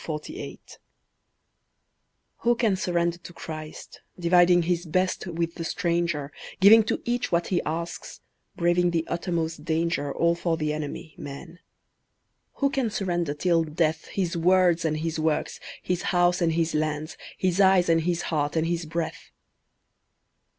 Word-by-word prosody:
(Matthew - - -12
5:38 - - -1
48) 310 - -9 1.6
Who 240 0 +2
can 225 -5 +2
surrender 175 -3 0
to 175 - -11
Christ, 155 -2 -9 0.2
dividing 175 0 +5
his 175 0 -1
best 185 +4 0
with 170 -1 -2
the 170 - -6
stranger, 170 -4 -1 0.3
Giving 215 +4 +8
to - - -2
each 240 0 -1
what 170 0 +1
he 180 - +1
asks, 170 +2 -5 0.3
braving 175 +1 +2
the 165 -1 -1
uttermost 165 -3 -2
danger 160 -3 -1
All 170 +3 +2
for 170 -1 -1
the 155 -2 -1
enemy, 155 +1 -6
MAN? 165 +5 -9 1.0
Who 275 -1 +1
can 265 -4 0
surrender 175 -7 -1
till 165 +1 +2
death 155 0 -1
His 180 -4 -2
words 175 0 +3
and 155 -1 0
his 160 0 -3
works, 155 -1 -1 0.2
his 180 -1 -1
house 175 0 +2
and 165 -1 +2
his 165 0 0
lands, 155 +1 -2 0.2
His 185 +1 +1
eyes 190 -2 +5
and 165 -1 +3
his 175 +1 -1
heart 145 0 0
and 160 0 +1
his 170 -1 -2
breath? 165 0 -4
170 Hz, 150 wpm, -26 LUFS, 160-180 Hz, 1.6 s, Giving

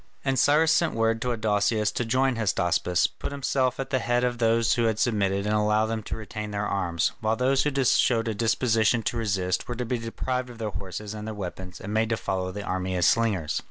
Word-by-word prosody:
And 135 -2 +1
Cyrus 155 +4 +4
sent 160 -2 +2
word 115 0 +1
to 125 - 0
Adousius 110 -1 +1
to - - -1
join 130 +3 +1
Hystaspas, 90 -5 +1
put - - -4
himself 130 -2 0
at 135 0 -4
the 130 - +2
head 120 +1 0
of 120 -1 -1
those 115 0 +3
who 120 - +1
had 110 -1 +1
submitted 100 -4 +1
and 105 - 0
allow 105 0 +2
them 110 0 -3
to - - -5
retain 105 0 -6
their 105 0 -2
arms, 90 -4 0
while 110 0 +1
those 130 +3 +2
who 140 -2 0
showed 115 -2 +3
a 110 - 0
disposition 115 +1 +2
to 115 - -1
resist 95 -5 -1
were 120 - -4
to 125 +1 -3
be 120 +1 -2
deprived 125 +2 -3
of 120 - -11
their 110 -2 -3
horses 100 +2 -6
and 105 0 -7
their 110 - -5
weapons 90 -2 -7
and 105 - -6
made 110 0 +1
to 115 - 0
follow 95 -2 -2
the 100 +2 -6
army 95 -1 -2
as 90 -2 +2
slingers. 95 -10 +1
110 Hz, 230 wpm, -26 LUFS, 100-120 Hz, -, Cyrus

